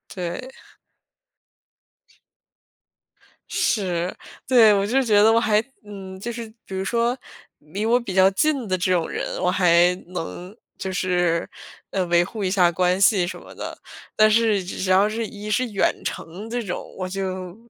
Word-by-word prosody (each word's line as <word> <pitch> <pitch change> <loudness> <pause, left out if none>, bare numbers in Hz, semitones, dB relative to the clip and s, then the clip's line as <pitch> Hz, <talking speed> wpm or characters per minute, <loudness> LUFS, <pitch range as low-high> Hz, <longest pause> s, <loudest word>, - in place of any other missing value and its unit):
对。 185 +9 -5 3.0
是。 185 -6 -1 0.3
对， 235 -5 +6
我 200 -1 +1
就 255 +6 +2
觉 215 -5 +4
得 220 +2 +6
我 230 - +4
还 215 -2 +2 0.2
嗯， 195 -2 -9
就 235 +5 -4
是 230 -1 -6 0.2
比 190 - -7
如 190 - -2
说 235 +4 0 0.4
离 185 +9 -5
我 240 +2 +3
比 235 -6 -6
较 190 0 +6
近 265 +4 0
的 185 -1 0
这 185 +1 0
种 175 -3 +1
人， - - -4
我 180 - +2
还 175 -1 +4
能 180 +2 -7 0.2
就 190 - -4
是， 180 -3 0 0.4
呃， 190 - 0
维 170 0 +4
护 210 +4 -6
一 185 - +1
下 180 -3 +4
关 180 +1 +1
系 195 -2 +4
什 - - -6
么 - - -13
的。 - - -7 0.4
但 215 0 +5
是 215 -3 +2
只 180 - -7
是 185 - -2
要 190 +2 +5
是 225 +1 -3
一 210 0 -8
是 250 +4 +1
远 195 - +2
程 190 +7 -6
这 240 +1 -2
种， 180 -4 -4
我 185 - -3
就 185 -1 -4
195 Hz, 180 characters per minute, -23 LUFS, 180-220 Hz, 3.0 s, 对